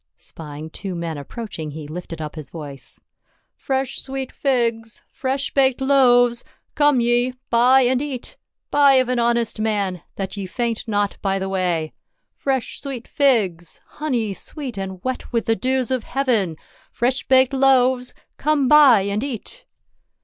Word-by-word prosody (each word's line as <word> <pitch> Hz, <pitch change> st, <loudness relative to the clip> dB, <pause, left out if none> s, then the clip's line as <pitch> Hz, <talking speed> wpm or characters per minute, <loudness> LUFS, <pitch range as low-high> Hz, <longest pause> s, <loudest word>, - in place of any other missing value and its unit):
Spying 155 Hz, 0 st, -9 dB
two 190 Hz, +1 st, -6 dB
men 170 Hz, -1 st, -4 dB
approaching 165 Hz, -, -7 dB
he 150 Hz, 0 st, -8 dB
lifted 165 Hz, +1 st, -7 dB
up 150 Hz, -, -6 dB
his 155 Hz, -3 st, -8 dB
voice 145 Hz, -5 st, -9 dB, 0.2 s
— -, -, -44 dB
" -, -, -50 dB
Fresh 265 Hz, -1 st, -2 dB
sweet 270 Hz, -1 st, -5 dB
figs! 230 Hz, -5 st, -1 dB
Fresh 270 Hz, -1 st, -2 dB
baked 265 Hz, -2 st, +3 dB
loaves! 245 Hz, -3 st, +4 dB, 0.3 s
Come 290 Hz, -3 st, +4 dB
ye, 240 Hz, +2 st, +1 dB, 0.2 s
buy 250 Hz, +3 st, +5 dB
and 255 Hz, 0 st, +2 dB
eat. 275 Hz, -4 st, -5 dB, 0.4 s
Buy 285 Hz, -1 st, +6 dB
of 255 Hz, -1 st, +3 dB
an 250 Hz, -1 st, +1 dB
honest 235 Hz, -1 st, +1 dB
man, 200 Hz, -5 st, -1 dB
that 195 Hz, 0 st, -4 dB
ye 200 Hz, -2 st, -5 dB
faint 235 Hz, +3 st, -3 dB
not 205 Hz, -2 st, 0 dB
by 195 Hz, -1 st, 0 dB
the 190 Hz, 0 st, -3 dB
way. 175 Hz, -4 st, -1 dB, 0.4 s
Fresh 265 Hz, -3 st, -2 dB
sweet 265 Hz, -4 st, -6 dB
figs! 200 Hz, -, +1 dB
— -, -, -42 dB
honey 240 Hz, -9 st, -1 dB
sweet 265 Hz, -, -6 dB
and 190 Hz, -2 st, -6 dB
wet 255 Hz, 0 st, -4 dB
with 230 Hz, -2 st, 0 dB
the 225 Hz, -, +2 dB
dews 260 Hz, +1 st, -1 dB
of 255 Hz, -3 st, 0 dB
heaven! 230 Hz, -, 0 dB, 0.3 s
Fresh 250 Hz, +3 st, -1 dB
baked 260 Hz, +1 st, +4 dB
loaves! 260 Hz, -2 st, +3 dB, 0.2 s
Come 295 Hz, -2 st, +1 dB
buy 280 Hz, -7 st, +7 dB
and 200 Hz, +3 st, -2 dB
eat 280 Hz, -, -6 dB
240 Hz, 160 wpm, -21 LUFS, 195-265 Hz, 0.4 s, buy